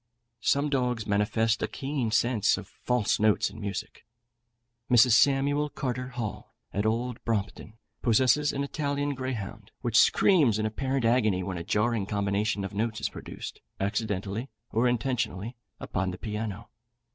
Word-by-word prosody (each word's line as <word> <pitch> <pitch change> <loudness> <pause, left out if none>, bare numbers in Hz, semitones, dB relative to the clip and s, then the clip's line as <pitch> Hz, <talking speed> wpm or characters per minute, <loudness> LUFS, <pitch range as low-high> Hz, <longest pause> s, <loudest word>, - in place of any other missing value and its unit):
Some 140 +6 +2
dogs 125 -5 0
manifest 105 +2 +1
a - - 0
keen 135 -4 -2
sense 115 0 +2
of - - -8
false 125 -4 0
notes 110 -1 +3
in - - -10
music. 100 -2 -5 0.9
Mrs. 125 0 +6
Samuel 140 +4 +4
Carter 125 -2 -3
Hall, 120 -4 -6 0.2
at 100 +2 0
Old 120 +2 -2
Brompton, 110 0 -3 0.2
possesses 130 +5 +3
an 140 - -2
Italian 145 0 -1
greyhound, 110 -6 -5
which 120 -1 +3
screams 150 - +5
in 110 - -1
apparent 130 +3 -1
agony 110 -6 +3
when 90 -1 -4
a - - -5
jarring 105 +2 0
combination 100 0 0
of 95 - -6
notes 110 +1 -1
is - - -1
produced, - - -8 0.2
accidentally 100 +3 -2 0.2
or 115 +3 +2
intentionally, 120 -3 -1 0.4
on 95 0 0
the 90 - -5
piano. 105 -1 -5
115 Hz, 145 wpm, -28 LUFS, 105-130 Hz, 0.9 s, Mrs